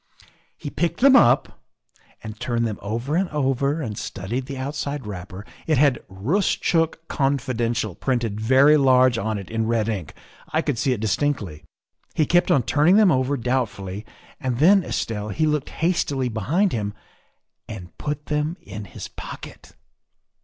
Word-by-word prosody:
" -, -, -35 dB
He 145 Hz, -, -7 dB
picked 170 Hz, 0 st, -1 dB
them 270 Hz, 0 st, +7 dB
up 120 Hz, -, +4 dB, 0.6 s
and 110 Hz, -1 st, -8 dB
turned 120 Hz, -1 st, -1 dB
them 110 Hz, -2 st, -3 dB
over 115 Hz, +8 st, -3 dB
and 185 Hz, +1 st, +1 dB
over 140 Hz, +1 st, 0 dB
and 110 Hz, -4 st, -4 dB
studied 120 Hz, +8 st, -4 dB
the 140 Hz, -2 st, -6 dB
outside 140 Hz, 0 st, -4 dB
wrapper. 95 Hz, 0 st, -7 dB, 0.2 s
It 155 Hz, -3 st, +3 dB
had 140 Hz, -2 st, +3 dB
' -, -, -39 dB
Roostchook 165 Hz, -, 0 dB
Confidential,' 120 Hz, -, -1 dB
printed 115 Hz, -2 st, -2 dB
very 135 Hz, +6 st, +5 dB
large 130 Hz, -3 st, +4 dB
on 110 Hz, 0 st, -2 dB
it 100 Hz, +1 st, -8 dB
in 115 Hz, 0 st, -1 dB
red 115 Hz, -2 st, +1 dB
ink; 100 Hz, -8 st, -4 dB, 0.3 s
I 160 Hz, +1 st, 0 dB
could 140 Hz, -7 st, -1 dB
see 135 Hz, -, +1 dB
it 120 Hz, -5 st, -1 dB
distinctly. 110 Hz, -, -1 dB, 0.5 s
He 155 Hz, -, +3 dB
kept 175 Hz, +4 st, +3 dB
on 135 Hz, -, +4 dB
turning 150 Hz, -, +3 dB
them 210 Hz, -4 st, +6 dB
over 130 Hz, +1 st, +1 dB
doubtfully, 110 Hz, -6 st, -2 dB, 0.4 s
and 130 Hz, -5 st, -2 dB
then, 185 Hz, +7 st, +5 dB
Estelle, 105 Hz, -8 st, -3 dB
he 155 Hz, +10 st, 0 dB
looked 150 Hz, -2 st, 0 dB
hastily 145 Hz, -7 st, 0 dB
behind 155 Hz, -, 0 dB
him 105 Hz, -2 st, -3 dB, 0.7 s
and 90 Hz, -3 st, -9 dB
put 150 Hz, 0 st, -4 dB
them 150 Hz, +3 st, -1 dB
in 105 Hz, +1 st, -8 dB
his -, -, -8 dB
pocket. -, -, -10 dB
130 Hz, 160 wpm, -23 LUFS, 110-150 Hz, 0.7 s, them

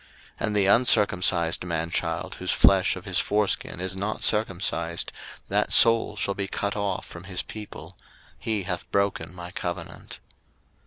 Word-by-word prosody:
01:017:014 -, -, -1 dB
And 105 Hz, -, -2 dB
the 100 Hz, -2 st, +3 dB
uncircumcised 95 Hz, -7 st, +3 dB
man 85 Hz, -2 st, -2 dB
child 85 Hz, -2 st, -2 dB
whose -, -, -4 dB
flesh -, -, +4 dB
of -, -, -9 dB
his -, -, +2 dB
foreskin 105 Hz, -4 st, 0 dB
is 95 Hz, +1 st, -2 dB
not 100 Hz, +3 st, -3 dB
circumcised, 90 Hz, -5 st, 0 dB, 0.4 s
that -, -, 0 dB
soul 115 Hz, -2 st, +6 dB
shall 100 Hz, -1 st, -1 dB
be 100 Hz, 0 st, -3 dB
cut 100 Hz, +1 st, -2 dB
off 100 Hz, -1 st, -2 dB
from 85 Hz, +1 st, -11 dB
his 95 Hz, -2 st, -2 dB
people; 95 Hz, -5 st, -9 dB, 0.4 s
he 110 Hz, -3 st, -2 dB
hath 90 Hz, -1 st, -4 dB
broken 100 Hz, -5 st, 0 dB
my 90 Hz, -1 st, -9 dB
covenant. 85 Hz, -2 st, -6 dB
95 Hz, 155 wpm, -25 LUFS, 85-105 Hz, 0.4 s, soul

